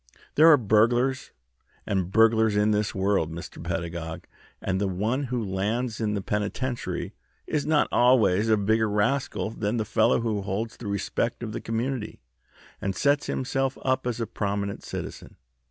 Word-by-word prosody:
There 155 +2 +6
are 150 - +8
burglars 120 +4 +2 0.6
and 95 -2 -1
burglars 110 0 +4
in 105 +1 +3
this 105 0 0
world, 95 -4 +1
Mr. 85 0 -8
Pedagog, 85 -2 -4 0.3
and 95 0 -1
the 100 - +1
one 110 +9 -1
who 125 -2 -2
lands 110 +5 -2
in 105 -1 0
the 100 - -3
penitentiary 110 +5 -3 0.3
is 150 -1 -2
not 155 -1 +3
always 110 -4 +4
a 110 - +5
bigger 110 +2 +2
rascal 110 +2 0
than 110 +1 -2
the 110 - -1
fellow 110 +2 +2
who 110 -3 -1
holds 105 +4 -3
the 115 - -7
respect 100 +4 -2
of 110 - -4
the - - -5
community 115 0 -3 0.6
and 95 -1 -2
sets 145 +1 +2
himself 135 +1 -1
up 130 -1 0
as 120 -1 -2
a 115 - -1
prominent 100 -2 -3
citizen. - - -7
110 Hz, 160 wpm, -26 LUFS, 100-120 Hz, 0.6 s, are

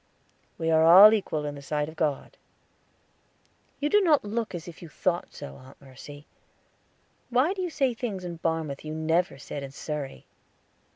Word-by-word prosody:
"We 165 0 -1
are 160 0 +4
all 190 +6 +9
equal 160 -8 -1
in 145 - -4
the 140 - -10
sight 150 +1 -2
of 160 - -10
God." 150 -4 -2 1.4
"You 290 - 0
do 415 +7 +4
not 310 - +3
look 220 -1 -3
as 175 +1 -7
if 170 - -11
you 170 - -10
thought 175 +2 -2
so, 70 0 -10
Aunt 130 +1 -16
Mercy. 145 +2 -13 1.0
Why 255 +9 +2
do 390 - -5
you 360 - -2
say 275 -6 0
things 215 -6 -5
in 170 -1 -6
Barmouth 160 -4 -2
you 155 0 -6
never 160 0 0
said 140 +2 -7
in 140 - -7
Surrey?" 140 0 -6
165 Hz, 175 wpm, -26 LUFS, 150-215 Hz, 1.4 s, all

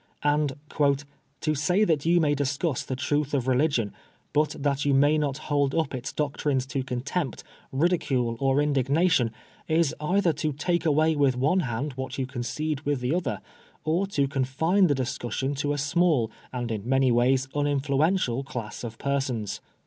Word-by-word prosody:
And 145 -1 +2 0.4
" 140 -1 -19
to 155 - +1
say 180 +8 +2
that 160 -6 +1
you 175 +1 +5
may 150 -3 +3
discuss 140 +1 -1
the 130 - -4
truth 145 +2 0
of 130 -2 -1
religion, 130 -5 +1 0.4
but 150 0 +2
that 140 0 0
you 140 -1 +3
may 145 +3 +4
not 140 -2 -1
hold 145 -2 0
up 160 -4 0
ita 125 -1 -5
doctrines 140 -2 0
to 135 - 0
contempt, 135 +4 -3 0.3
ridicule, 135 -6 +1
or 135 0 +2
indignation, 140 -1 +2 0.4
is 160 -2 +2
either 180 +2 +2
to 155 0 -2
take 170 +4 0
away 155 +1 +3
with 140 -3 +2
one 150 +9 +2
hand 135 -1 -2
what 130 +1 -5
you 135 - -1
concede 135 +4 -3
with 145 -2 -1
the 125 +4 -1
other, 130 - -2 0.4
or 170 +5 +1
to 145 -8 +1
confine 150 +8 +2
the 145 - +2
discussion 130 +1 -2
to 145 +1 -1
a 145 - -1
small 145 -4 +2 0.2
and 120 -2 -3
in 110 +1 -4
many 135 -1 +3
ways 130 +2 +3
uninfluential 145 0 +1
class 120 -5 -6
of 115 -1 -6
persons.' 135 -6 -2
140 Hz, 170 wpm, -26 LUFS, 130-155 Hz, 0.4 s, you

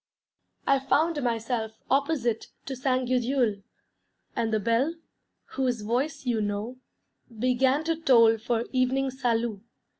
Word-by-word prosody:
I 275 0 +4
found 300 +3 +1
myself 230 -2 -1
opposite 270 -5 0 0.2
to 270 - -4
Ste. 255 -1 0
Gudule; 245 -4 +1 0.7
and 230 -2 0
the 215 - +2
bell, 235 - +1 0.6
whose 250 -4 -1
voice 255 +7 -2
you 235 -3 +1
know, 205 +4 -3 0.6
began 255 +5 +2
to 330 0 0
toll 230 -8 +5
for 235 +1 -1
evening 260 +1 +1
salût. 235 -5 -1
250 Hz, 120 wpm, -27 LUFS, 230-270 Hz, 0.7 s, toll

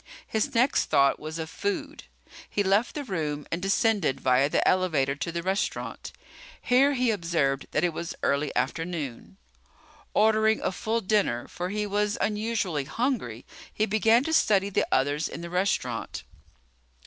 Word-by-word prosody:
His 225 +5 -2
next 250 +4 +3
thought 140 0 +3
was 155 +1 -6
of 160 -1 -4
food. 305 - -4 0.4
He 205 - 0
left 200 +6 +2
the 295 - -3
room 155 - -3
and 170 - -2
descended 195 - +1
via 130 +2 +3
the - - +1
elevator 160 -8 +2
to 170 - -3
the 170 0 -4
restaurant. 190 +3 -2 0.5
Here 275 +3 +3
he 250 -2 +2
observed 165 -8 0
that 150 - 0
it 175 -2 +1
was 170 +1 -5
early 140 +1 +1
afternoon. 140 - -3 0.8
Ordering 220 +1 +4
a - - 0
full 225 +4 -2
dinner, 190 - 0
for 180 +1 -5
he 210 +1 -2
was 205 +1 0
unusually 210 -8 -1
hungry, 160 - -2 0.3
he 215 - 0
began 220 +3 +3
to 320 - -2
study 200 -9 +3
the - - +1
others 145 +4 +1
in - - -7
the 170 0 -7
restaurant. 180 -11 -1
185 Hz, 155 wpm, -27 LUFS, 150-220 Hz, 0.8 s, Ordering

